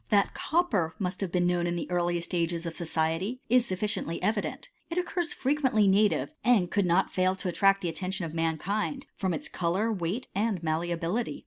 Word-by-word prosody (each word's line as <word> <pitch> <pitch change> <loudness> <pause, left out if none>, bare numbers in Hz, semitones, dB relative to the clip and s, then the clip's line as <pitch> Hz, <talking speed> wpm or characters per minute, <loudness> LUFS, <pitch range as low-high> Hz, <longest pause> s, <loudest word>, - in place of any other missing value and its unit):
3. 210 - +5
That 200 - +2
copper 220 - 0
must 185 -2 -3
have 190 -3 -2
been 175 0 +2
known 175 -1 +1
in 175 - -1
the 170 - -3
earliest 175 0 0
ages 170 0 0
of 165 - -3
society, 165 +7 -1
is 245 0 +4
sufficiently 190 -3 -2
evident. 210 - -1 0.2
It 335 - -4
occurs 355 -1 -1
fre 265 - -2
t - - -3
quently 220 -7 +4
native, 205 +7 +3
and 220 -8 +3
could 200 -3 +2
not 175 +3 +2
fail 185 0 +2
to 190 - -5
attract 195 +2 +3
the 175 - -1
atten«> 165 +3 -3
tion 190 -2 -2
of 160 - -6
mankind, 195 - -1
from 190 -2 -1
its 160 - -2
colour, 190 +6 0
weight, 190 +6 -2
and 205 -1 0
mall^, 165 +2 0
bility. 180 +9 -2
185 Hz, 210 wpm, -28 LUFS, 170-215 Hz, 0.2 s, 3